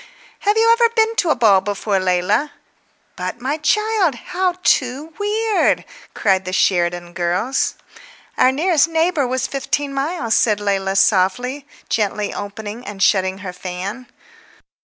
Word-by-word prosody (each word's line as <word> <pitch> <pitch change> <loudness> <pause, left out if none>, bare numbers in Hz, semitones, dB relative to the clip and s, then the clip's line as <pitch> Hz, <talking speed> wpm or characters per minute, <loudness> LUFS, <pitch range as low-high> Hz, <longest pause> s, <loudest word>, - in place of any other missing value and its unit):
"Have 415 +2 +1
you 445 - +4
really 460 0 +5
never 465 -1 +4
been 445 0 +2
to 345 - +1
a - - +3
ball 200 -5 +4
before, 200 0 -1
Leila? 185 +10 0 0.6
But, 185 +5 -5
my 270 +5 -2
child, 400 - +1
how 365 +7 -2
too 270 +5 +1
weird—" 425 +1 +1 0.3
cried 190 -3 +2
the 185 - -5
Sheridan 175 -2 0
girls. 180 +9 -1 0.6
"Our 255 - +4
nearest 325 +3 +2
neighbour 325 -3 +1
was 255 +1 -1
fifteen 280 +1 -2
miles," 275 -4 -1
said 210 -3 +2
Leila 195 -1 -1
softly, 245 +9 +1 0.2
gently 210 -1 -1
opening 205 +3 -7
and 200 -5 -4
shutting 190 -1 +2
her 180 - -5
fan. 190 +8 -6
245 Hz, 140 wpm, -19 LUFS, 195-320 Hz, 0.6 s, really